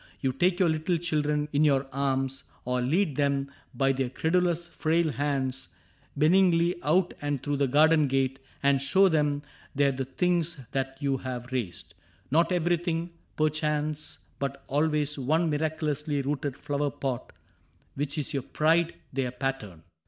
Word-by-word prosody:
You 130 -2 0
take 175 +6 +2
your 185 - +4
little 160 +2 +1
children 150 -3 0
in 145 +2 +3
your 140 -2 +3
arms. 135 -1 -1 0.2
Or 125 0 0
lead 150 +3 +1
them 140 -1 0 0.2
by 135 -1 +3
their 130 -1 -1
credulous 170 +4 +1
frail 165 -1 +1
hands 135 -2 -2 0.5
Benignly 170 +1 +4
out 175 +4 +2
and 145 -3 -2
through 145 -1 -1
the 140 0 +2
garden 155 +2 +5
gate 135 0 0 0.2
And 140 -1 +3
show 190 +7 +4
them 150 -3 +1 0.3
there 140 0 +3
the 135 0 -3
things 170 +3 0
that 135 0 -2
you 140 -1 +1
have 125 -1 -6
raised; 95 -8 -4 0.4
Not 165 +5 +3
everything, 175 -1 0 0.2
perchance, 155 0 -1 0.2
but 140 0 -3
always 150 0 0
one 160 +5 +1
Miraculously 150 -1 -1
rooted 140 -1 -2
flower 145 0 -1
plot 130 -3 -4 0.6
Which 145 +2 -3
is 150 - -2
your 140 - 0
pride, 165 +5 +1 0.2
their 130 -1 0
pattern. 125 - -4
145 Hz, 145 wpm, -28 LUFS, 135-160 Hz, 0.6 s, garden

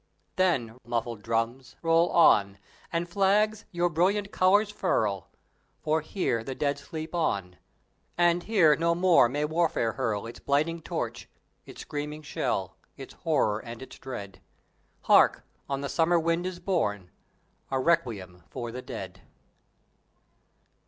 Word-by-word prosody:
Then, 125 -11 +1
muffled 115 -2 -3
drums, 115 +3 -2
roll 165 +1 +4
on, 100 -12 +4 0.3
and 170 0 -1
flags 205 +3 +2
your 175 0 +1
brilliant 195 +5 +1
colors 205 +2 +3
furl; 105 - -1 0.5
For 155 +1 0
here 150 - -1
the 130 +2 -5
Dead 145 0 -1
sleep 160 +1 -7
on, 100 - -1 0.6
and 175 0 +3
here 175 -8 +4
no 170 +1 +1
more 175 -8 +5
may 145 +4 -1
warfare 155 -7 +1
hurl 110 -5 -2
Its 115 - -9
blighting 155 +4 0
torch, - - -5 0.4
its - - -10
screaming 150 +1 -5
shell, 95 -9 -2 0.2
its 135 - -10
horror 145 -10 0
and 115 0 -9
its 130 - -11
dread. 100 -8 -8 0.6
Hark! - - +5 0.3
on 140 0 -2
the 140 - -3
summer 170 +3 +2
wind 165 +2 0
is 185 -1 -5
born 105 - -1 0.6
a 135 - 0
Requiem 105 - 0
for 120 -1 -5
the 125 +2 -6
Dead! - - -8
150 Hz, 135 wpm, -27 LUFS, 115-175 Hz, 0.6 s, more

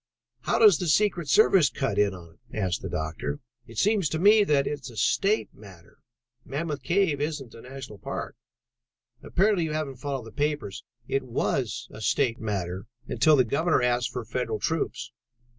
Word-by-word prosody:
"How - - 0
does 430 -2 +7
the 180 - -2
secret 175 -2 +2
service 190 -4 +5
cut 135 +1 -2
in 105 -1 +3
on 85 -2 -13 0.2
it?" - - -9
asked 95 -4 -1
the - - -5
doctor. 80 -2 -3 0.3
"It 115 - -12
seems 200 - +2
to 160 - -2
me 210 +5 +6
that 145 -6 +2
it 145 - -2
is 135 - -9
a 115 - -12
state 200 - +1
matter. 95 -5 -16 0.4
Mammoth 150 +1 -4
Cave 170 -6 +1
isn't 145 -5 -3
a 115 - -11
National 130 -5 -9
Park." - - -5 0.9
"Apparently 190 -2 +2
you 155 - -3
haven't 150 -4 -3
followed 135 -2 -4
the 115 - -10
papers. 145 -7 -2 0.2
It 135 - 0
was 125 -1 -2
a 110 - -10
state 120 +1 +1
matter 95 -2 -3 0.2
until 155 -2 +4
the 130 - +5
Governor 140 +4 +1
asked 120 0 +1
for 120 -1 -5
federal 115 -1 -2
troops. 160 +7 -2
135 Hz, 175 wpm, -26 LUFS, 110-160 Hz, 0.9 s, does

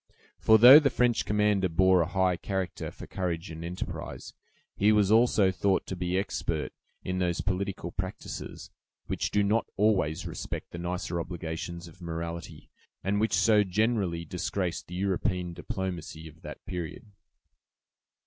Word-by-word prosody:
For 110 - +6
though 125 +6 +11
the 145 -3 +2
French 120 -2 +1
commander 105 -2 +2
bore 95 +2 +4
a 85 - 0
high 95 0 +1
character 95 0 -3
for - - -10
courage 85 -1 -3
and 80 +1 -7
enterprise, 90 +2 -6 0.4
he 105 +2 +4
was 105 -2 +3
also 110 -4 +4
thought 95 +1 +1
to 95 - -5
be 90 0 -1
expert 95 - -2 0.3
in 90 0 -2
those 90 -1 0
political 95 -2 -2
practises 95 +1 -6 0.3
which - - -2
do 105 - +2
not 105 +3 +1
always 95 -6 +2
respect - - -6
the 85 - -7
nicer 85 0 -3
obligations 85 0 -5
of 85 +2 -16
morality, 85 0 -6 0.3
and 100 +3 0
which 110 +1 +1
so 105 -2 +5
generally 100 -4 0
disgraced 90 +1 -3
the 90 - -8
European 90 -2 -1
diplomacy 85 -3 -5
of 80 +1 -15
that - - -10
period. 90 +1 -6
95 Hz, 150 wpm, -28 LUFS, 85-100 Hz, 0.4 s, though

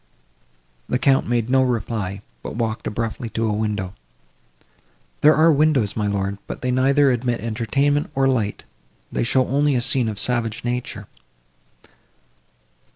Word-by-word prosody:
The - - +1
Count 135 +1 +2
made 120 -1 0
no 130 +1 +3
reply, 110 -6 -2 0.2
but - - -7
walked 115 -1 -2
abruptly 115 +1 -3
to 115 +1 -2
a 105 - 0
window. 105 -3 -2 1.3
"There 155 +1 +6
are 160 +2 +5
windows, 145 -8 +2
my 105 -2 -1
lord, 100 0 -2
but - - -6
they 125 - 0
neither 135 +2 +3
admit 120 -1 -1
entertainment, 135 +6 0
nor 135 0 +3
light; 115 -6 -1 0.5
they - - -1
show 130 +2 +2
only 145 +1 +2
a - - +2
scene 120 -1 +2
of 105 - -5
savage 115 0 -1
nature." 125 +1 -3
120 Hz, 145 wpm, -22 LUFS, 110-135 Hz, 1.3 s, There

